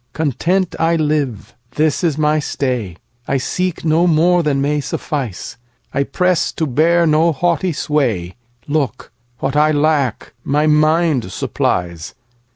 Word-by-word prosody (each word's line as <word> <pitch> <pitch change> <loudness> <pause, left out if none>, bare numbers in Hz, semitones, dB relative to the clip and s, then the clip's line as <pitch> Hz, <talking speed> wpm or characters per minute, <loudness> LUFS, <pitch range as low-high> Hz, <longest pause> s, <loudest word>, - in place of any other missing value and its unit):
Content 170 +5 0
I 165 +1 +2
live, 150 -7 -1 0.2
this 155 +2 +1
is 160 -4 +1
my 155 0 +2
stay;I 120 - -4
seek 180 +7 -2
no 165 +3 +3
more 175 +2 +3
than 150 -4 0
may 145 +1 0
suffice;I 125 - -5
press 180 +4 +1
to 160 - -1
bear 165 +5 +2
no 160 +2 +3
haughty 175 +3 0
sway; 125 - -1 0.3
Look, 145 -6 -2 0.3
what 135 +1 -1
I 150 +1 +4
lack 145 -5 0
my 150 +2 +1
mind 155 - +2
supplies. 85 -3 -2
150 Hz, 125 wpm, -17 LUFS, 130-160 Hz, 0.3 s, I